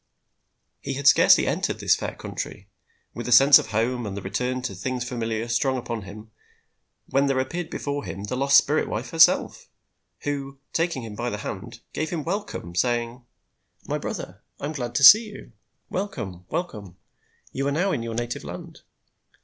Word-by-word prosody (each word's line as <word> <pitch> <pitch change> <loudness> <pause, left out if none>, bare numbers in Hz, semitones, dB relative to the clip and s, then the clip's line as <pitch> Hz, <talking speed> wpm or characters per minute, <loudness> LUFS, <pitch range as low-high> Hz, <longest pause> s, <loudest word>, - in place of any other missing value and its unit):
He 135 - -4
had 140 0 -5
scarcely 140 - +6
entered - - -1
this - - +3
fair - - -5
country, 95 - -7 0.5
with 120 - -6
a - - -2
sense 135 +4 +9
of - - -5
home 115 +2 -1
and 100 -1 -5
the - - -4
return 125 +6 -2
to 100 - -3
things 125 +6 -3
familiar 115 -2 -3
strong 130 +3 +1
upon 120 -2 -4
him, 105 +3 -11 0.8
when 140 +1 +2
there 135 -1 +1
appeared 160 +6 -2
before 145 -3 -4
him 100 - -6
the 105 +5 -3
lost 140 +1 +5
spirit 150 +2 +2
wife 110 +4 -4
herself, 165 0 +4 0.5
who, 140 -1 -4 0.2
taking 165 -6 -1
him 110 -2 -7
by 120 +3 -3
the 105 - -4
hand, 110 +3 -7
gave 155 - -2
him 165 -4 -3
welcome, 170 - -4
saying: 120 +5 -1 0.6
"My - - -2
brother, - - -6 0.2
I - - -4
am 150 - -3
glad 120 -4 -5
to 140 - +1
see 215 - +10
you. 205 - -12 0.4
Welcome! 100 - -5
welcome! 105 - -5 0.5
You 135 +1 -2
are - - +1
now 180 +7 +1
in 140 - -1
your 115 -1 -5
native 120 +1 -3
land! - - -9
125 Hz, 180 wpm, -24 LUFS, 110-140 Hz, 0.8 s, see